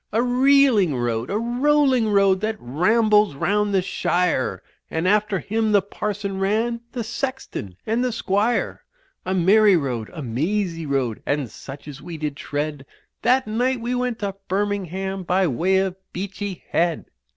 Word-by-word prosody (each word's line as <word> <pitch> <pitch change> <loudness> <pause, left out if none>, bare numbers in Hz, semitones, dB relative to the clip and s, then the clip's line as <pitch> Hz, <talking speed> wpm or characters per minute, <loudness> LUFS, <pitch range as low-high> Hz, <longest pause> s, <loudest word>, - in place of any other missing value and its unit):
A 230 +2 +2
reeling 250 - +4
road, 120 -1 -1
a 205 - 0
rolling 255 0 +2
road, 195 -2 +3
that 220 +1 -1
rambles 210 - +3
round 205 +7 +1
the 190 -2 +2
shire, 175 - 0 0.3
And 160 +3 -1
after 210 0 +2
him 220 +3 -1
the 205 - +5
parson 200 -1 -4
ran, 225 +4 0
the 245 -3 -3
sexton 235 - -5
and 230 +3 0
the 250 - 0
squire. 215 +1 0 0.4
A 185 - 0
merry 195 +2 +5
road, 125 -7 -3
a 160 -4 -7
mazy 165 - -1
road, 130 -5 -1
and 140 -5 -1
such 140 +2 -10
as 145 -1 -9
we 170 -2 -7
did 150 -2 -3
tread 145 -1 -4 0.4
That 260 +1 +3
night 245 +4 0
we 240 +2 -2
went 250 -2 -1
to 200 -1 -2
Birmingham 195 -1 -2
by 185 +1 +1
way 175 +6 +1
of 190 -1 0 0.2
Beachy 195 0 -5
Head. 170 0 +1
195 Hz, 155 wpm, -22 LUFS, 165-225 Hz, 0.4 s, the